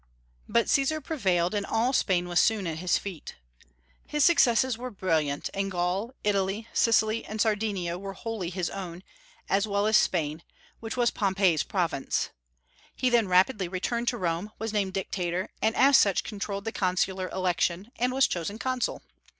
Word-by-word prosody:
But 235 - +2
Caesar 280 +3 +2
prevailed, 190 - 0
and 205 -1 0
all 230 +6 0
Spain 180 -7 +1
was 175 0 +2
soon 220 -4 +2
at 160 -2 -3
his 180 0 +2
feet. 190 -6 -7 0.7
His 295 -2 +1
successes 260 -7 +4
were 250 +2 -6
brilliant; 160 - -1
and 195 0 -1
Gaul, 185 +7 -2
Italy, 200 +2 0
Sicily, 225 0 +2
and 215 - -7
Sardinia 205 -5 0
were 195 0 -6
wholly 210 -3 -4
his 180 -1 -3
own, 180 -2 -7 0.4
as 200 +2 +1
well 200 0 0
as 215 0 +3
Spain, 160 -5 +1 0.4
which 225 +2 -6
was 240 -1 +3
Pompey's 190 -6 +2
province. 170 -8 -1 0.6
He 255 -1 +1
then 235 -4 +3
rapidly 185 +2 +3
returned 235 +7 -2
to 240 - +1
Rome, 175 +1 -2
was 220 -1 -4
named 195 -3 0
Dictator, 185 -1 -2
and 220 +1 +1
as 275 0 +6
such 200 -2 +3
controlled 200 -1 -5
the 225 - -2
consular 185 -1 -1
election, 185 +2 -1
and 250 +1 +1
was 265 +1 +4
chosen 180 +4 -3
Consul. 255 +1 -2
200 Hz, 165 wpm, -27 LUFS, 180-225 Hz, 0.7 s, as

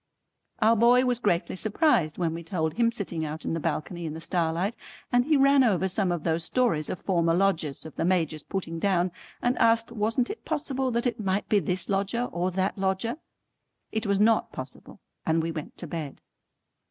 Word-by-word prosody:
Our 225 +1 +5
boy 240 +3 +5
was 245 -2 +1
greatly 185 -7 0
surprised 205 - +2
when 170 -3 0
we 165 - -5
told 160 -2 -2
him 230 +5 +2
sitting 185 -8 -4
out 155 +1 -5
in - - -1
the 165 - -1
balcony 165 +2 -3
in 155 - -5
the - - -6
starlight, 175 +5 0 0.4
and 245 0 +3
he 305 0 +3
ran 275 0 +5
over 190 -6 +2
some 190 -1 0
of 175 -3 -2
those 165 0 0
stories 195 - +1
of 180 - -4
former 170 -3 +1
Lodgers, 170 -8 0
of 160 - -9
the - - 0
Major's 165 -4 +1
putting 165 -2 -4
down, 185 -1 +1 0.3
and 245 +1 +1
asked 230 0 +3
wasn't 230 +2 0
it 440 - -9
possible 275 -4 -2
that 235 0 -1
it 240 -2 -1
might 195 -1 -1
be 210 - +4
this 185 -2 -1
lodger 200 +4 0
or 175 +1 -1
that 190 +2 -1
lodger. 195 +6 -1 0.7
It 220 0 -2
was 200 -1 +2
not 220 +1 +3
possible, 130 0 -9 0.2
and 160 +1 +2
we 165 - -2
went 155 -2 -7
to - - -5
bed. 155 -3 -6
190 Hz, 200 wpm, -27 LUFS, 165-230 Hz, 0.7 s, Our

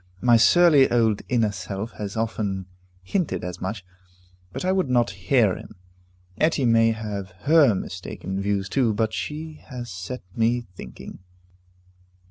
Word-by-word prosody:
My 120 +1 +5
surly 150 +3 +6
old 115 -3 +2
inner 115 -4 +2
self 100 +3 -5
has 105 0 -6
often 105 -4 -2 0.4
hinted 175 - -2
as 90 0 -6
much, 100 -4 -4 0.7
but 135 - -5
I 185 - +2
would 185 -7 +1
not 120 -3 +2
hear 95 +2 +2
him. - - -11 0.6
Etty 155 -4 +2
may 115 -1 +4
have 105 -3 -4
her 145 - +5
mistaken 95 +1 -5
views 100 -1 -1
too, 115 -1 +1
but 110 0 0
she 155 +1 -5
has 120 -3 -7
set 95 +7 -6
me 120 +1 +1
thinking. - - -10
115 Hz, 140 wpm, -24 LUFS, 100-125 Hz, 0.7 s, surly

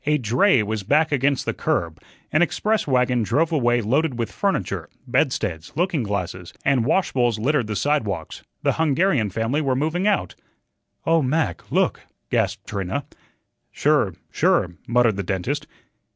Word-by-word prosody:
A 150 0 +4
dray 130 - +3
was 110 0 -3
back 150 +10 +2
against 140 -1 +1
the - - -1
curb, 80 -2 -2 0.3
an 155 - +3
express 210 +4 +1
wagon 125 -2 +2
drove 155 +9 +1
away 120 -6 +2
loaded 135 +5 0
with 115 -2 -2
furniture; - - -2 0.2
bedsteads, 80 0 -1
looking 175 -2 0
glasses, 90 -4 -4
and 130 -4 +3
washbowls 125 - +1
littered 130 +1 +1
the 105 - -3
sidewalks. 105 - -1 0.2
The - - +2
Hungarian 150 - +2
family 115 +9 -1
were 135 -3 0
moving 160 +8 0
out. 210 - +1 0.7
"Oh, 165 0 +3
Mac, 135 - -1
look!" - - +1 0.3
gasped - - 0
Trina. 100 +9 -3 0.7
"Sure, - - +2 0.2
sure," 90 - +2
muttered 120 -3 +3
the 100 - -2
dentist. 95 0 -2
125 Hz, 145 wpm, -23 LUFS, 105-150 Hz, 0.7 s, A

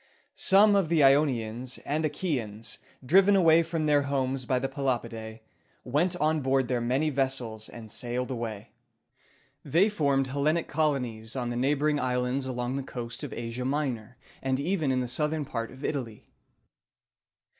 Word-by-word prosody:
Some 205 +2 +5
of 195 -5 +2
the 165 -3 +4
Ionians 130 -4 +2
and 150 +3 -1
Achæans, 130 - -3 0.3
driven 195 +7 +5
away 165 -3 +6
from 165 -1 -2
their 145 -1 +4
homes 135 -2 -1
by 130 - +1
the 135 - -1
Pelopidæ, 115 -5 -3 0.4
went 160 +8 +1
on 155 -2 +1
board 135 -1 +1
their 125 -1 0
many 130 +6 +1
vessels, 130 -5 -1
and 110 -2 -10
sailed 125 +3 -3
away. 115 -4 -5 0.9
They 170 +8 +3
formed 140 -8 +1
Hel 140 +2 -3
len´ic 160 +2 +1
colonies 125 -8 -1
in 120 -2 -2
the - - -3
neighboring 145 +4 +1
islands 125 +1 -1
along 125 +1 -2
the - - -2
coast 120 -3 -7
of - - -5
Asia 120 +1 -4
Minor, 125 -4 -2 0.2
and 130 0 0
even 160 -2 0
in 130 -1 +1
the 125 - -2
southern 150 +4 -1
part 115 -3 -4
of 130 +2 -9
Italy. 120 -7 -4
135 Hz, 155 wpm, -28 LUFS, 120-150 Hz, 0.9 s, away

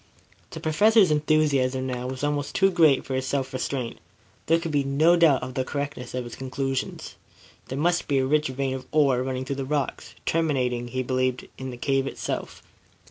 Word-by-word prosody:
The - - -7
Professor's 205 +4 +4
enthusiasm 145 -4 +2
now 125 -1 -3
was 130 +1 -5
almost 145 -1 -1
too 195 0 +4
great 160 -6 +4
for 135 - -4
his 130 0 -1
self 135 -1 -2
restraint. 130 -2 -3 0.5
There 165 - +5
could 165 -1 -4
be 145 -1 +2
no 150 +5 +4
doubt 165 -6 +4
of 130 - -5
the 130 0 -1
correctness 140 -2 -5
of 125 - -2
his 120 -1 -8
conclusions. 135 0 -4 0.5
There 130 - -5
must 175 +4 +1
be 140 - +1
a 130 - +2
rich 150 +2 +2
vein 130 0 -2
of 130 -1 -6
ore 140 -5 +3
running 130 0 -3
through 135 +1 -3
the 135 - -2
rocks, 140 0 -3
terminating, 130 -7 0
he 130 +1 -2
believed, 130 0 -1
in 130 0 -5
the 125 - -7
cave 135 +1 0
itself. - - -5
135 Hz, 190 wpm, -25 LUFS, 130-150 Hz, 0.5 s, There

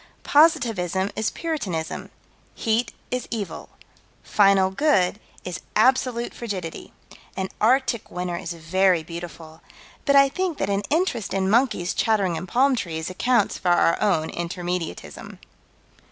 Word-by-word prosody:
Positivism 225 - +3
is 220 0 0
Puritanism. 195 - -4 0.5
Heat 230 +2 0 0.2
is 250 0 -2
Evil. 215 -4 -5 0.5
Final 195 -2 +4
Good 200 -5 +2 0.3
is 180 -1 -4 0.2
Absolute 240 +1 +2
Frigidity. 190 -8 -6 0.5
An 190 0 -2
Arctic 240 0 +2
winter 180 0 -3
is 175 -1 -5
very 175 +1 +2
beautiful, 165 -1 -9 0.4
but 280 - +3
I 275 0 +7
think 360 +3 -2
that 195 - -1
an 200 0 +1
interest 280 - 0
in 190 0 +1
monkeys 220 -7 +2
chattering 200 -6 +1
in 165 +3 -5
palm 260 +7 +3
trees 165 -6 -4
accounts 235 +3 +1
for 180 - 0
our 175 -1 +3
own 175 -7 +1
Intermediatism. 175 - -5
195 Hz, 125 wpm, -24 LUFS, 175-245 Hz, 0.5 s, I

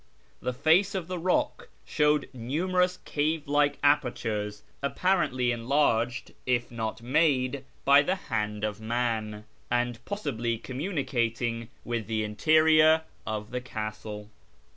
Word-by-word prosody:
The 125 - -1
face 160 +10 +3
of 180 -3 -3
the 180 -1 -4
rock 180 +2 0 0.2
showed 150 0 +2
numerous 180 +9 0
cave 155 +1 -1
like 145 0 +2
apertures, 110 -7 +1 0.2
apparently 140 -5 +1
enlarged, 120 -1 +1
if 120 -1 +1
not 115 0 -4
made, 135 -1 +2 0.2
by 140 +1 +7
the 180 +6 0
hand 105 - -3
of 105 0 -2
man, 110 -2 -2 0.2
and 120 -1 -1
possibly 120 - -2
communicating 120 - -2 0.2
with 115 -3 -3
the 110 -1 -1
interior 155 +7 +4 0.2
of 105 -1 -4
the 125 0 -3
castle. 110 -2 -6
125 Hz, 120 wpm, -28 LUFS, 115-150 Hz, 0.2 s, by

